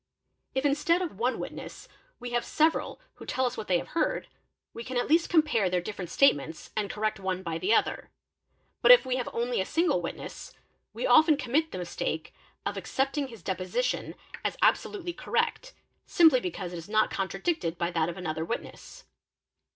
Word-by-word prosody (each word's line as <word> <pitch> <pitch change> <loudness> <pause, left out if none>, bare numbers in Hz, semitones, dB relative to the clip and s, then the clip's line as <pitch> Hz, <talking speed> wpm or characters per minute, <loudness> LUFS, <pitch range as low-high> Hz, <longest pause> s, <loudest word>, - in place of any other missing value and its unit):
If 265 +2 0
instead 300 +5 +2
of 310 - -6
one 250 +2 +1
witness - - -8 0.3
we 245 0 -6
have 240 0 0
several 320 +8 +1 0.2
who - - -10
tell 260 - 0
us 250 0 -1
what 210 - -6
they 180 - +3
have - - -6
heard, 330 - -1 0.5
we 230 - -7
can 255 +1 -4
at 245 - 0
least 330 +2 +3
compare 300 - +3
their 180 0 +1
different 180 -1 -6
statements 160 - +2
and 210 -2 -1
correct 215 -1 -2
one 190 -1 -2
by 165 -2 -3
the 185 +4 0
other; - - 0 0.7
but - - +4
if - - +9
we 255 0 0
have 250 - -3
only 240 -2 -1
a - - +1
single 335 - +1
witness, - - -7 0.4
we - - -4
'often 315 -9 +6
commit 290 +4 0
the - - -5
mistake 180 -1 -4 0.3
of - - -2
accepting 275 +1 -1
his 230 -8 -13
deposition 190 +7 -2 0.3
as - - -2
absolutely 355 -4 +1
cor - - -11
rect, - - 0 0.3
simply 320 -7 +6
because 180 -2 -5
it - - -5
is 165 +3 -9
not 215 0 +2
contradicted 195 - -2
by 170 0 -1
that 165 -1 +1
of 175 - -6
another 160 -3 -3
witness. 235 - -7
235 Hz, 185 wpm, -28 LUFS, 185-300 Hz, 0.7 s, if